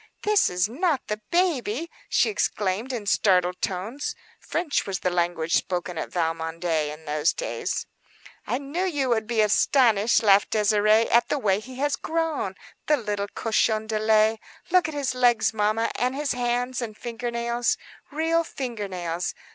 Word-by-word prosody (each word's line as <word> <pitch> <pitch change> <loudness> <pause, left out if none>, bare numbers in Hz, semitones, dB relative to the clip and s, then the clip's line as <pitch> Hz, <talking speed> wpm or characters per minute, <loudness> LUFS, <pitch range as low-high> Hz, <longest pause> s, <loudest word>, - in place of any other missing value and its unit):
"This 420 -1 +3
is 180 +2 +1
not 295 - -1
the 210 0 -3
baby!" 330 - 0 0.2
she - - +3
exclaimed, 210 - -1
in 235 -5 -4
startled 180 -3 +2
tones. 205 +9 -3 0.2
French 330 -9 -1
was 190 -2 -3
the 180 - 0
language 170 -2 -1
spoken 180 -1 0
at - - -4
Valmondé 165 -2 -1
in 155 +1 -11
those 150 +1 +1
days. - - -3 0.6
"I - - 0
knew 285 +6 -3
you 290 -8 0
would 220 -2 +1
be 230 -2 +2
astonished," 220 0 +3
laughed 200 -1 +5
Désirée, 215 +1 +3
"at 235 +1 +4
the - - +1
way 200 -7 +1
he 255 +4 -11
has 280 +2 0
grown. 320 - -2 0.3
The 300 - +4
little 205 -4 -3
cochon 220 -1 +1
de 220 -1 -2
lait! 215 0 +3 0.3
Look 365 -1 +4
at 315 - -6
his 280 -3 -1
legs, 245 -3 +3
mamma, 215 +1 +1
and 250 +2 -1
his 290 0 -1
hands 245 +1 -1
and 215 -3 -6
finger 240 0 -4
nails,—real 245 +7 -1
finger 240 -9 -5
nails. 175 -2 -3
225 Hz, 160 wpm, -25 LUFS, 195-265 Hz, 0.6 s, laughed